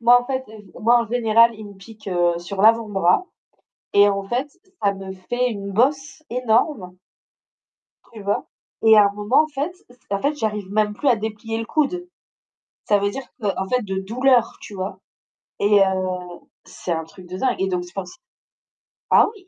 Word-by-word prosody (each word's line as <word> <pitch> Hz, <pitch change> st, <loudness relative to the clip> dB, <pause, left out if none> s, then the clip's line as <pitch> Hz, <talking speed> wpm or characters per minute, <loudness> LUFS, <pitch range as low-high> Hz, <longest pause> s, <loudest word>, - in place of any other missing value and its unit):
moi 245 Hz, +1 st, +6 dB
en -, -, -9 dB
fait 260 Hz, -1 st, -2 dB, 0.4 s
moi 235 Hz, +2 st, +5 dB
en -, -, -7 dB
général, 230 Hz, 0 st, +4 dB
il 215 Hz, -1 st, -10 dB
me 200 Hz, -, -12 dB
pique, 215 Hz, +2 st, -12 dB
heu, 175 Hz, -2 st, +1 dB
sur 190 Hz, +3 st, -5 dB
l'avant-bras, 215 Hz, -, +3 dB, 0.7 s
et 205 Hz, 0 st, +6 dB
en 200 Hz, 0 st, -1 dB
fait, 250 Hz, +7 st, -2 dB, 0.3 s
ça 200 Hz, -1 st, +2 dB
me 190 Hz, 0 st, -7 dB
fait 245 Hz, +7 st, -1 dB
une 200 Hz, -2 st, -5 dB
bosse 275 Hz, +8 st, 0 dB
énorme 230 Hz, -, 0 dB, 1.2 s
tu 220 Hz, -, -10 dB
vois? 200 Hz, +1 st, -1 dB, 0.4 s
Et 220 Hz, -1 st, +7 dB
à 210 Hz, -, +8 dB
un 200 Hz, -, -1 dB
moment 210 Hz, +9 st, +3 dB
en -, -, -5 dB
fait 295 Hz, +3 st, -3 dB, 0.4 s
en 200 Hz, 0 st, 0 dB
fait, 290 Hz, +2 st, 0 dB
j'arrive 210 Hz, -6 st, -3 dB
même 210 Hz, 0 st, +2 dB
plus 285 Hz, -, -5 dB
à 250 Hz, -, +6 dB
déplier 220 Hz, +1 st, -4 dB
le 225 Hz, -, -3 dB
coude. 355 Hz, +6 st, -1 dB, 0.8 s
Ça 205 Hz, -, +3 dB
veut 200 Hz, 0 st, 0 dB
dire 270 Hz, -, -6 dB, 0.2 s
que 210 Hz, -, -3 dB
en 190 Hz, 0 st, -3 dB
fait 250 Hz, -1 st, +1 dB
de 190 Hz, -1 st, -3 dB
douleur, 240 Hz, +4 st, +2 dB
tu 205 Hz, -, -10 dB
vois? 190 Hz, 0 st, -5 dB, 0.6 s
Et 205 Hz, 0 st, +4 dB
heu, 185 Hz, -2 st, -1 dB, 0.3 s
c'est 175 Hz, -, -7 dB
un 160 Hz, -1 st, -1 dB
truc 180 Hz, +2 st, -15 dB
de 185 Hz, +1 st, -6 dB
dingue 255 Hz, +2 st, +1 dB
et 190 Hz, -, +1 dB
donc, 180 Hz, -2 st, -1 dB
je 175 Hz, -, -16 dB
pense 185 Hz, -2 st, -7 dB, 0.9 s
ah -, -, +7 dB
oui! 380 Hz, -3 st, -18 dB
210 Hz, 190 wpm, -22 LUFS, 195-245 Hz, 1.2 s, à